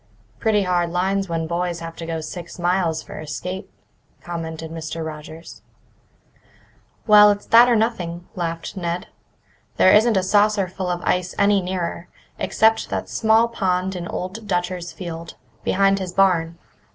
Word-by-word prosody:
"Pretty 210 -2 +2
hard 175 -2 +1
lines 190 +2 0
when 165 -1 -1
boys 170 +1 -2
have 165 0 -7
to 165 - -6
go 165 -1 -3
six 170 +2 -8
miles 175 -2 0
for - - -9
a 155 - -8
skate," 180 +6 -5 0.5
commented 165 -2 -6
Mr. 165 0 -5
Rogers. 155 +1 -9 1.4
"Well, 210 -1 +8
it's 205 0 -1
that 235 +2 +7
or 240 - +4
nothing," 180 -6 -1
laughed 165 -1 -4
Ned. 175 +1 -3 0.7
"There 185 - +6
isn't 220 0 +5
a 190 - +2
saucerful 195 -2 +1
of 175 -1 -2
ice 180 0 0
any 200 -1 +3
nearer, 180 -1 -4 0.3
except 220 +4 +2
that - - -3
small 225 +1 +3
pond 190 -4 -1
in 175 -1 -5
Old 205 +6 -5
Dutcher's 175 -1 -2
field, 170 -2 -7 0.3
behind 195 +1 +2
his 185 -2 -5
barn. 170 -4 +2
180 Hz, 150 wpm, -22 LUFS, 170-195 Hz, 1.4 s, Well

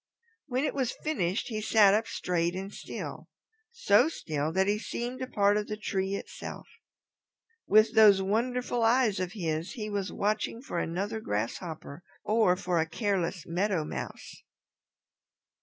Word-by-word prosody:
When 255 0 0
it - - -1
was 265 -3 -1
finished 195 - -1
he 215 -2 -3
sat 210 -2 +5
up 220 +2 +1
straight 175 0 -1
and 195 +2 -5
still, - - -7 0.4
so 250 - +4
still 155 - -3
that 190 +3 +2
he 205 +1 +1
seemed 245 +3 -4
a 255 - -2
part 205 -3 +3
of 210 - -2
the 210 - -4
tree 195 -2 -2
itself. - - -7 1.0
With 215 +2 +5
those 215 -3 +7
wonderful 240 +5 0
eyes 225 -3 +3
of 185 +1 -3
his 165 -4 -3
he 215 -5 -5
was 200 -1 -2
watching 215 +2 -1
for 175 - -3
another 195 +7 -2
grasshopper 150 - -4 0.2
or 215 -4 +3
for 180 -2 -1
a 160 0 0
careless 185 -3 -1
Meadow 180 -1 0
Mouse. - - -7
205 Hz, 150 wpm, -29 LUFS, 180-225 Hz, 1.0 s, those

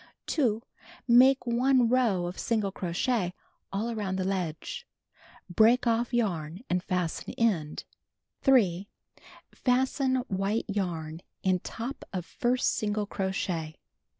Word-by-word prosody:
2. 230 -7 +1 0.4
Make 255 +2 +6
1 250 +1 +3
row 230 -8 +2
of 175 +1 -5
single 215 -4 0
crochet 185 +1 -1 0.4
all 215 +4 -2
around 205 -4 -2
the 190 - -1
ledge. 190 - -3 0.6
Break 220 +8 +4
off 235 0 +1
yarn 180 -7 -1
and 180 0 +2
fasten 180 -3 -2
end. 180 -10 0 0.6
3. 200 - +3 0.7
Fasten 260 +1 +1
white 195 +3 -1
yarn 170 -6 -3 0.2
in 185 -1 +2
top 235 +9 -6
of 180 -3 -4
first 250 +5 +1
single 210 0 -1
crochet. 185 -5 -3
205 Hz, 115 wpm, -28 LUFS, 180-240 Hz, 0.7 s, Make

